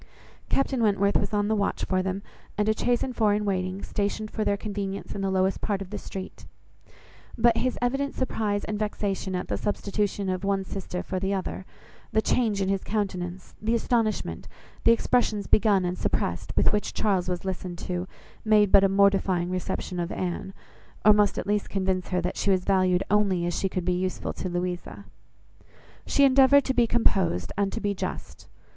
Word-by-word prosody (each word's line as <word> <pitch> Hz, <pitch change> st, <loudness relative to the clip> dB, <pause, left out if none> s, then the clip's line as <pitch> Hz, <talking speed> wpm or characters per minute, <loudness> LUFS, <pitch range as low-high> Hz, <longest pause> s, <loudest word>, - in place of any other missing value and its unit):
Captain 270 Hz, -2 st, +1 dB
Wentworth 200 Hz, -2 st, +2 dB
was 200 Hz, -, +1 dB
on 205 Hz, -1 st, +1 dB
the 220 Hz, -, +1 dB
watch 200 Hz, -1 st, -1 dB
for 185 Hz, -1 st, +1 dB
them, 190 Hz, +1 st, -3 dB, 0.3 s
and 210 Hz, 0 st, +1 dB
a 220 Hz, -, +3 dB
chaise 240 Hz, +2 st, +1 dB
and 255 Hz, -2 st, -4 dB
four 210 Hz, -2 st, +3 dB
in 210 Hz, 0 st, -1 dB
waiting, 185 Hz, -1 st, -2 dB
stationed 210 Hz, +1 st, -2 dB
for 220 Hz, -, -2 dB
their 200 Hz, -1 st, +1 dB
convenience 200 Hz, -1 st, -4 dB
in 200 Hz, -, -4 dB
the 195 Hz, -, 0 dB
lowest 190 Hz, 0 st, +1 dB
part 205 Hz, -3 st, -1 dB
of 195 Hz, -1 st, -8 dB
the 210 Hz, -, -3 dB
street; 190 Hz, -1 st, -8 dB, 0.9 s
but 235 Hz, 0 st, +4 dB
his 255 Hz, 0 st, 0 dB
evident 270 Hz, +3 st, 0 dB
surprise 210 Hz, -5 st, -1 dB
and 210 Hz, -1 st, -3 dB
vexation 200 Hz, -3 st, -2 dB
at 180 Hz, -, -3 dB
the -, -, -1 dB
substitution 205 Hz, -1 st, -1 dB
of 185 Hz, 0 st, -2 dB
one 195 Hz, -1 st, +1 dB
sister 185 Hz, -2 st, -5 dB
for 185 Hz, -, -3 dB
the 195 Hz, +1 st, 0 dB
other, 190 Hz, 0 st, -4 dB, 0.4 s
the 220 Hz, -, +3 dB
change 220 Hz, -3 st, +1 dB
in -, -, -1 dB
his 195 Hz, 0 st, 0 dB
countenance, 185 Hz, -3 st, -3 dB
the 225 Hz, +2 st, +1 dB
astonishment, 215 Hz, -, -1 dB, 0.4 s
the 230 Hz, -, +7 dB
expressions 230 Hz, -3 st, +1 dB
begun 205 Hz, -4 st, +3 dB
and 180 Hz, +1 st, -2 dB
suppressed, -, -, -1 dB
with -, -, +4 dB
which 210 Hz, -, -1 dB
Charles 190 Hz, -4 st, +1 dB
was 180 Hz, 0 st, -3 dB
listened 185 Hz, -2 st, -4 dB
to, 180 Hz, +1 st, -4 dB, 0.4 s
made 210 Hz, -2 st, +4 dB
but 195 Hz, -, +7 dB
a 195 Hz, -, +4 dB
mortifying 195 Hz, -2 st, +2 dB
reception 185 Hz, 0 st, -3 dB
of 175 Hz, +1 st, -2 dB
Anne; 185 Hz, +2 st, -3 dB, 0.5 s
or 215 Hz, -, +9 dB
must 205 Hz, -1 st, +2 dB
at -, -, -2 dB
least 205 Hz, 0 st, 0 dB
convince 190 Hz, -2 st, -1 dB
her 180 Hz, -1 st, 0 dB
that 180 Hz, -, -3 dB
she -, -, 0 dB
was 185 Hz, -2 st, +2 dB
valued 185 Hz, -1 st, +3 dB
only 195 Hz, -4 st, +2 dB
as 175 Hz, -, -1 dB
she 195 Hz, -, -1 dB
could 180 Hz, -1 st, -3 dB
be 180 Hz, -, +2 dB
useful 185 Hz, +1 st, -2 dB
to 185 Hz, -, -4 dB
Louisa. 175 Hz, 0 st, -4 dB, 1.0 s
She 280 Hz, -, +3 dB
endeavoured 275 Hz, +1 st, +6 dB
to 265 Hz, -, -1 dB
be 240 Hz, -2 st, +3 dB
composed, 185 Hz, -, +1 dB
and 200 Hz, -1 st, 0 dB
to -, -, -3 dB
be 205 Hz, -2 st, -1 dB
just. 190 Hz, -, -6 dB
200 Hz, 195 wpm, -26 LUFS, 185-215 Hz, 1.0 s, or